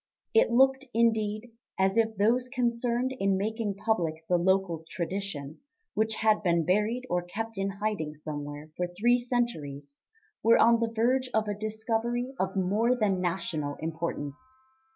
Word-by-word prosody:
It 450 Hz, -, +5 dB
looked, 265 Hz, +3 st, +4 dB
indeed, 220 Hz, 0 st, +1 dB, 0.3 s
as 190 Hz, +1 st, +2 dB
if 225 Hz, -1 st, +2 dB
those 240 Hz, +5 st, +2 dB
concerned 245 Hz, 0 st, 0 dB
in 195 Hz, -1 st, +2 dB
making 215 Hz, 0 st, -2 dB
public 170 Hz, -7 st, -1 dB
the 180 Hz, -, +3 dB
local 185 Hz, -2 st, +1 dB
tradition, 170 Hz, -5 st, -4 dB, 0.3 s
which 220 Hz, +1 st, 0 dB
had 215 Hz, -1 st, +2 dB
been 170 Hz, -4 st, +2 dB
buried 210 Hz, +7 st, +1 dB
or 180 Hz, -6 st, 0 dB
kept 225 Hz, +6 st, -5 dB
in 195 Hz, 0 st, 0 dB
hiding 195 Hz, -6 st, -3 dB
somewhere 145 Hz, 0 st, -7 dB
for 180 Hz, -, -1 dB
three 240 Hz, +3 st, +4 dB
centuries, 150 Hz, -, -3 dB, 0.4 s
were 230 Hz, +1 st, +5 dB
on 230 Hz, 0 st, +5 dB
the 230 Hz, -1 st, 0 dB
verge 250 Hz, +3 st, +1 dB
of 220 Hz, -1 st, +2 dB
a 205 Hz, -, 0 dB
discovery 225 Hz, +4 st, -2 dB
of 190 Hz, +1 st, -1 dB
more 210 Hz, +6 st, +2 dB
than 200 Hz, -6 st, +1 dB
national 160 Hz, -5 st, -2 dB
importance. 165 Hz, -, -5 dB
210 Hz, 150 wpm, -28 LUFS, 175-235 Hz, 0.4 s, It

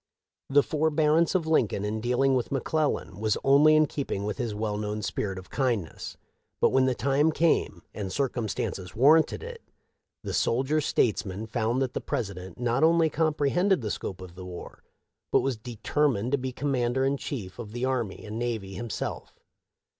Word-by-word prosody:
The 140 Hz, +1 st, +5 dB
forbearance 155 Hz, +2 st, +2 dB
of 175 Hz, -4 st, +2 dB
Lincoln 115 Hz, -10 st, +1 dB
in 110 Hz, +1 st, -2 dB
dealing 125 Hz, +3 st, +2 dB
with 125 Hz, 0 st, 0 dB
McClellan 140 Hz, -, -1 dB
was 110 Hz, -1 st, +1 dB
only 145 Hz, +3 st, +6 dB
in 155 Hz, 0 st, +5 dB
keeping 135 Hz, -9 st, -3 dB
with 105 Hz, 0 st, -3 dB
his 115 Hz, -4 st, -2 dB
well 105 Hz, 0 st, -2 dB
known 105 Hz, 0 st, -3 dB
spirit 95 Hz, -2 st, -2 dB
of 95 Hz, -, -10 dB
kindness; 120 Hz, -, -2 dB, 0.4 s
but, -, -, +4 dB
when 130 Hz, 0 st, +4 dB
the 130 Hz, -, +1 dB
time 140 Hz, +5 st, +2 dB
came 165 Hz, +1 st, +1 dB
and 100 Hz, -3 st, -5 dB
circumstances 110 Hz, -8 st, -2 dB
warranted 155 Hz, -, +4 dB
it, 475 Hz, 0 st, -8 dB, 0.6 s
the -, -, -4 dB
soldier 135 Hz, +6 st, +1 dB
states 120 Hz, -5 st, +1 dB
man 100 Hz, +2 st, -5 dB
found 115 Hz, +3 st, 0 dB
that 130 Hz, -, -3 dB
the -, -, -3 dB
President 95 Hz, -4 st, -4 dB
not 120 Hz, +3 st, +1 dB
only 165 Hz, -1 st, +4 dB
compre 150 Hz, -3 st, +1 dB
hended 185 Hz, -1 st, +2 dB
the 105 Hz, -3 st, -3 dB
scope 95 Hz, -1 st, -5 dB
of 90 Hz, -2 st, -10 dB
the 90 Hz, +1 st, -9 dB
war, 90 Hz, -1 st, -9 dB, 0.5 s
but -, -, +4 dB
was 135 Hz, -2 st, -1 dB
determined 120 Hz, +1 st, -1 dB
to 140 Hz, -, +3 dB
be 130 Hz, 0 st, -3 dB
commander 130 Hz, -1 st, 0 dB
in 135 Hz, +1 st, +2 dB
chief 115 Hz, -8 st, -6 dB
of 110 Hz, -3 st, -7 dB
the 120 Hz, +2 st, -2 dB
army 120 Hz, -8 st, -2 dB
and 110 Hz, +1 st, -5 dB
navy 110 Hz, -5 st, -3 dB
himself. 115 Hz, +3 st, -5 dB
125 Hz, 175 wpm, -27 LUFS, 105-145 Hz, 0.6 s, only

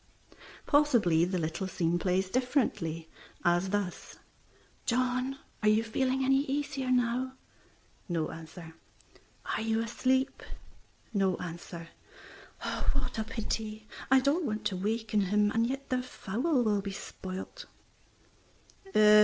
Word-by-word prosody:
Possibly 240 Hz, -, +4 dB
the 185 Hz, +1 st, -1 dB
little 165 Hz, +3 st, -2 dB
scene 175 Hz, -2 st, +1 dB
plays 185 Hz, +2 st, +1 dB
differently, 205 Hz, -, 0 dB, 0.4 s
as 175 Hz, +2 st, +3 dB
thus 200 Hz, -2 st, -2 dB, 0.7 s
"John, 255 Hz, +2 st, +1 dB, 0.2 s
are 215 Hz, -, +4 dB
you 215 Hz, +1 st, +4 dB
feeling 260 Hz, +3 st, +1 dB
any 270 Hz, +1 st, +5 dB
easier 275 Hz, -2 st, -2 dB
now?" 250 Hz, +1 st, +2 dB, 0.8 s
No 165 Hz, -3 st, 0 dB
answer. 160 Hz, 0 st, -9 dB, 0.7 s
"Are -, -, -1 dB
you 225 Hz, 0 st, +1 dB
asleep?" 260 Hz, +4 st, +1 dB, 0.7 s
No 195 Hz, -3 st, +2 dB
answer. 170 Hz, 0 st, -7 dB, 1.0 s
"What -, -, -2 dB
a -, -, +1 dB
pity! 215 Hz, -1 st, -4 dB, 0.2 s
I 265 Hz, 0 st, +7 dB
don't 285 Hz, +7 st, +2 dB
want 215 Hz, -1 st, -3 dB
to 205 Hz, -2 st, +1 dB
waken 215 Hz, +2 st, 0 dB
him, 205 Hz, +2 st, +3 dB
and 230 Hz, +1 st, +2 dB
yet 270 Hz, +2 st, -4 dB
the 255 Hz, -1 st, +1 dB
fowl 250 Hz, -, 0 dB
will 210 Hz, -3 st, +2 dB
be 200 Hz, 0 st, -4 dB
spoilt." 190 Hz, -1 st, -7 dB
215 Hz, 120 wpm, -31 LUFS, 185-255 Hz, 1.0 s, I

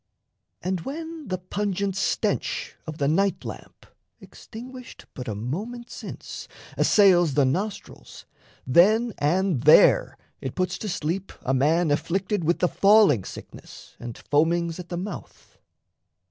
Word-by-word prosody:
And 185 Hz, -1 st, -1 dB
when 320 Hz, -, -7 dB
the 185 Hz, -, -2 dB
pungent 195 Hz, +1 st, -2 dB
stench 195 Hz, -, -1 dB
of 155 Hz, -1 st, -6 dB
the 140 Hz, -, 0 dB
night 195 Hz, +6 st, +1 dB
lamp, -, -, -9 dB, 0.3 s
Extinguished 250 Hz, +2 st, -11 dB
but 125 Hz, -, -7 dB
a 110 Hz, -, -3 dB
moment 210 Hz, -, -5 dB
since, -, -, -8 dB, 0.3 s
assails 175 Hz, -8 st, +4 dB
The 145 Hz, -, +4 dB
nostrils, 195 Hz, +10 st, -4 dB, 0.4 s
then 215 Hz, -, +4 dB
and 170 Hz, 0 st, +1 dB
there 155 Hz, +4 st, +5 dB, 0.2 s
it 130 Hz, -, -5 dB
puts 185 Hz, -1 st, -1 dB
to 215 Hz, -, -4 dB
sleep 180 Hz, +3 st, -3 dB
A 130 Hz, -, 0 dB
man 155 Hz, +5 st, +2 dB
afflicted 185 Hz, +5 st, -1 dB
with 170 Hz, +2 st, +2 dB
the 180 Hz, -, +2 dB
falling 195 Hz, -, +5 dB
sickness -, -, -11 dB
And 120 Hz, -1 st, -7 dB
foamings 165 Hz, +3 st, 0 dB
at 175 Hz, -, -8 dB
the 175 Hz, -, -4 dB
mouth. 190 Hz, +1 st, -8 dB
180 Hz, 130 wpm, -25 LUFS, 155-205 Hz, 0.4 s, there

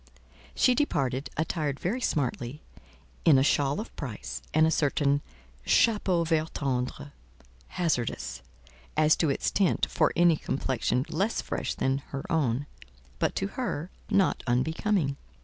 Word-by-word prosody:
She 255 Hz, -, +4 dB
departed, 135 Hz, -, 0 dB
attired 155 Hz, -3 st, -1 dB
very 225 Hz, +9 st, -2 dB
smartly, 135 Hz, -, -2 dB, 0.6 s
in 150 Hz, -4 st, +6 dB
a 130 Hz, -, +4 dB
shawl 140 Hz, +1 st, +2 dB
of 220 Hz, -, -7 dB
price, 125 Hz, -8 st, -6 dB
and 155 Hz, +1 st, +4 dB
a 160 Hz, -, +2 dB
certain 145 Hz, -2 st, +2 dB, 0.4 s
chapeau 195 Hz, -6 st, +3 dB
vert 160 Hz, -1 st, 0 dB
tendre—hazardous, 70 Hz, -, -3 dB, 0.6 s
as 155 Hz, 0 st, +5 dB
to 160 Hz, -, +2 dB
its 140 Hz, -, 0 dB
tint, 195 Hz, -3 st, +2 dB
for -, -, +2 dB
any 170 Hz, -2 st, +5 dB
complexion 130 Hz, -2 st, -1 dB
less 205 Hz, +4 st, 0 dB
fresh -, -, -3 dB
than 135 Hz, +1 st, 0 dB
her 135 Hz, -1 st, -6 dB
own, 140 Hz, -4 st, +1 dB, 0.5 s
but, -, -, 0 dB
to 195 Hz, -, -1 dB
her, 185 Hz, -, -4 dB, 0.2 s
not 195 Hz, -1 st, +2 dB
unbecoming. 145 Hz, -, +1 dB
145 Hz, 130 wpm, -28 LUFS, 130-170 Hz, 0.6 s, in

